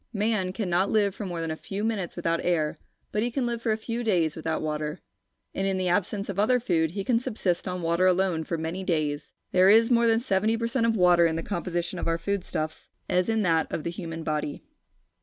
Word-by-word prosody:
Man 210 -3 0
cannot 190 -2 0
live 205 -2 +2
for 205 0 -5
more 175 -2 -4
than 165 -1 -2
a - - -2
few 195 +5 -5
minutes 210 -6 -2
without 165 0 -1
air, 155 -4 0 0.3
but 210 - 0
he 240 - +1
can 250 +1 -1
live 235 -1 -2
for 230 - 0
a 215 - +1
few 230 +2 -4
days 175 -8 +1
without 160 0 -2
water. 150 +1 -3 0.5
And 195 - -1
in 190 -1 0
the 185 -1 0
absence 200 +2 0
of 200 -1 -4
other 250 +4 +4
food, 165 -9 +1
he 195 +4 -4
can 230 +2 +2
subsist 210 -8 -2
on 180 -1 -3
water 170 +3 +3
alone 180 -3 +2
for 170 - -2
many 165 +4 -4
days. 155 -5 -1 0.2
There 185 +1 +5
is 225 +3 +6
more 235 -1 +4
than 225 0 +4
70% 230 +3 +1
of 225 - +2
water 175 -3 +5
in 160 - -1
the 165 - -3
composition 175 -2 -3
of - - -3
our 165 0 +1
food 200 +2 -2
stuffs, 155 -2 -4 0.2
as 180 +3 +1
in 220 -1 +1
that 165 -3 +1
of 155 - -3
the 170 - -2
human 165 -2 -6
body. 150 -2 -3
185 Hz, 230 wpm, -27 LUFS, 165-215 Hz, 0.5 s, is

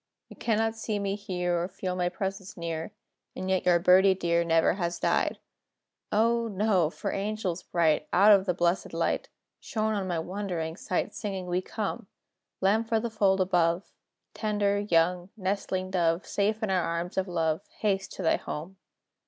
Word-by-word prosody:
You - - -12
cannot 225 0 0
see 220 -1 -2
me 200 -1 -1
here, 180 -4 -2
Or 175 - -1
feel 185 -1 -4
my 180 -1 0
presence 195 0 -5
near, 165 +1 -4 0.4
And 190 0 -3
yet 185 -1 +1
your 175 -1 +6
"Birdie" 185 +2 +5
dear 170 -2 +1
Never 165 -1 +3
has 175 -2 -2
died. - - +1 0.7
O, 230 +2 +2
no! 195 -5 +2
for 200 +4 -4
angels 195 -3 -2
bright, 155 -3 +1
Out 200 +4 +6
of 200 -1 +5
the 180 - +1
blesséd 175 0 0
light, 165 0 -1 0.3
Shone 220 -1 -1
on 200 -3 -2
my 175 -2 -1
wondering 175 -2 -3
sight, 180 - -2
Singing, 195 -4 -4
"We 180 +1 0
come! 215 +2 -4 0.5
Lamb 205 +4 +3
for 225 0 +1
the 235 +1 -3
fold 195 -3 +2
above 175 0 +1 0.4
Tender, 205 -2 0
young, 180 -2 +1
nestling 185 -1 -2
dove 170 -1 +1
Safe 215 +2 0
in 210 - 0
our 185 -1 +2
arms 170 +1 -3
of 190 0 0
love, 165 -2 0 0.2
Haste 195 -2 0
to 190 - -6
thy 160 - +3
home." 170 +6 -7
190 Hz, 170 wpm, -28 LUFS, 175-205 Hz, 0.7 s, your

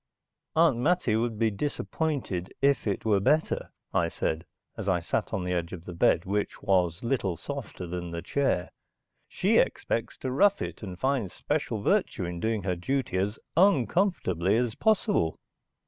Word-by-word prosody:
"Aunt 160 -6 +5
Mattie 125 -3 +2
would 115 0 0
be 110 0 +2
disappointed 140 - -2
if 140 -4 +2
it 100 - -2
were 105 -3 +4
better," 150 +10 +1 0.2
I - - +2
said 80 +2 -2 0.3
as 100 - -3
I 90 -2 +3
sat 85 - -2
on 95 - -1
the 90 0 -1
edge 85 0 -2
of 85 -2 -8
the 90 - -6
bed, 85 +1 +3
which 100 +2 -2
was 90 -2 +2
little 115 -8 0
softer 130 - -6
than 90 0 -4
the 85 0 -5
chair. 135 -11 0 0.6
"She - - +2
expects 115 - -1
to 130 - -3
rough 200 +9 +4
it, - - -5
and 95 -5 -6
finds 130 -5 0
special 125 -8 -2
virtue 185 - +1
in 85 0 -4
doing 110 0 -1
her 90 -2 0
duty 130 +3 -1
as 100 +3 0 0.2
uncomfortably 160 - +3
as 120 -2 0
possible." 145 - +2
105 Hz, 165 wpm, -28 LUFS, 90-140 Hz, 0.6 s, Aunt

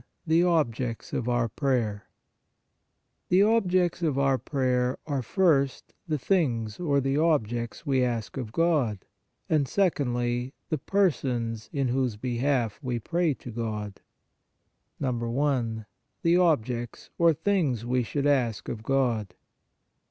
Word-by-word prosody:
THE 165 +1 +4
OBJECTS 125 -9 0
OF 120 - -1
OUR 120 -1 +1
PRAYERS 115 -4 -1 1.3
The 185 +2 +5
objects 185 -5 +2
of 155 -5 0
our 135 -1 +2
prayers 125 -1 0
are, 140 -4 -1
first, 140 - +1
the 155 -2 0
things 125 - 0
or 145 -5 +2
the 135 +1 0
objects 120 -5 0
we 135 -3 +2
ask 115 -4 -2
of 125 -5 -5
God, 140 - +1 0.4
and 150 -4 +2
secondly, 125 -8 0
the 155 - -1
per 195 +5 +3
sons 115 -5 -4
in 135 -3 0
whose 125 -3 0
behalf 120 -1 -1
we 125 -4 -2
pray 165 +5 0
to 125 - -10
God. 105 -3 -4 1.0
I. 130 - 0 1.1
THE 165 - +4
OBJECTS 125 -9 0
OR 170 -1 +5
THINGS 145 - 0
WE 125 +1 +1
SHOULD 140 +4 -2
ASK 125 -7 +1
OF 110 - -5
GOD. 115 -7 0
130 Hz, 130 wpm, -27 LUFS, 120-155 Hz, 1.3 s, The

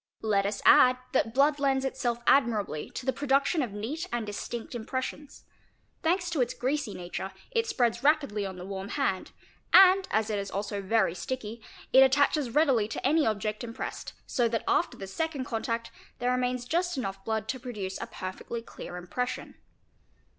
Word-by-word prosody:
Let 200 -2 +2
us 200 0 -4
add 255 0 +7
that 230 -3 +1
blood 285 +4 +3
lends 270 -1 +1
itself 245 -3 -1
admirably 220 - +2
to 255 - -7
the 265 - +1
production 280 +3 +2
of 245 -6 -2
neat 255 - -4
and 240 -2 -1
distinct 225 +4 -5
impressions; 260 +5 -5 0.6
thanks 355 +1 +1
to 310 -6 +1
its 245 - 0
greasy 265 -3 -1
nature 180 +2 -5 0.2
it 460 -2 +1
spreads 240 - +1
rapidly 280 -8 +2
on 190 -1 -5
the 180 0 -8
warm 195 0 -5
hand, 225 -9 -1 0.4
and 380 0 +7
as 220 0 +1
it 205 - 0
is 200 0 -4
also 200 0 -3
very 195 -2 +2
sticky, 225 +4 -5 0.3
it 265 - +9
attaches 275 +1 +4
readily 255 -5 +3
to 225 - -5
any 300 +1 +3
object 215 +1 -2
impressed, 230 -1 -6
so 240 -2 +1
that 230 -1 -1
after - - +1
the 195 - -6
second 285 - -3
contact 230 0 -3 0.3
there 245 +1 0
remains 250 0 0
just 350 +5 0
enough 195 -5 -4
blood 220 0 -2
to 260 - -2
produce 210 -7 -5
a - - -4
perfectly 190 +5 -6
clear 180 -5 -8
impres 250 +8 -2
sion. 255 - -7
240 Hz, 175 wpm, -28 LUFS, 210-275 Hz, 0.6 s, it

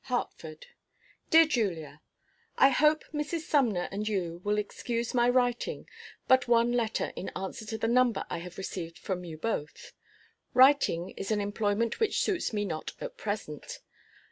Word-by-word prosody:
HARTFORD. 165 -11 -4 0.6
Dear 325 0 +8
Julia: 175 - -2 0.6
I 270 - +7
hope 300 +3 +3
Mrs. 300 +2 -2
Sumner 240 - +1
and 210 +2 -3
you 175 -5 -2
will 210 0 +1
excuse 230 +3 -3
my 240 -1 +3
writing 245 -1 0 0.4
but 260 -1 +4
one 235 0 +4
letter 235 -2 -1
in 190 - -5
answer 195 +3 -5
to 220 -1 -3
the 225 - -1
number 240 -2 +2
I - - -4
have 180 +1 -9
received 170 -3 -5
from 180 -2 -4
you 165 -3 -8
both. 155 -5 -4 0.6
Writing 255 -10 +5
is 195 - -5
an 215 -1 +1
employment 205 +2 -1
which 445 -2 +1
suits 365 -4 0
me 205 -2 -1
not 155 -5 -4
at - - -6
present. 205 -8 -5
220 Hz, 155 wpm, -29 LUFS, 185-250 Hz, 0.6 s, Dear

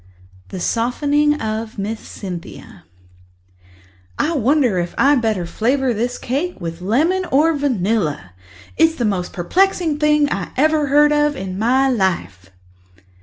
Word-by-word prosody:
The 185 - -6
Softening 290 - +1
of 220 0 -4
Miss 215 +3 -3
CynthiaToC 180 -4 -9 1.4
"I 335 - 0
wonder 260 -6 +2
if 175 0 -4
I'd 280 -2 +4
better 215 -6 -1
flavour 245 +8 0
this 240 +3 -2
cake 290 - -3
with 165 -1 -6
lemon 310 - +1
or 310 +4 +3
vanilla. 200 - -1 0.4
It's 325 0 +3
the 240 - -2
most 190 -4 -2
perplexing 330 - 0
thing 300 -1 +3
I 195 - -4
ever 305 +1 +2
heard 295 +2 +4
of 295 0 +2
in 190 -5 -5
my 260 +5 +2
life." 100 - -2
245 Hz, 130 wpm, -19 LUFS, 190-295 Hz, 1.4 s, I'd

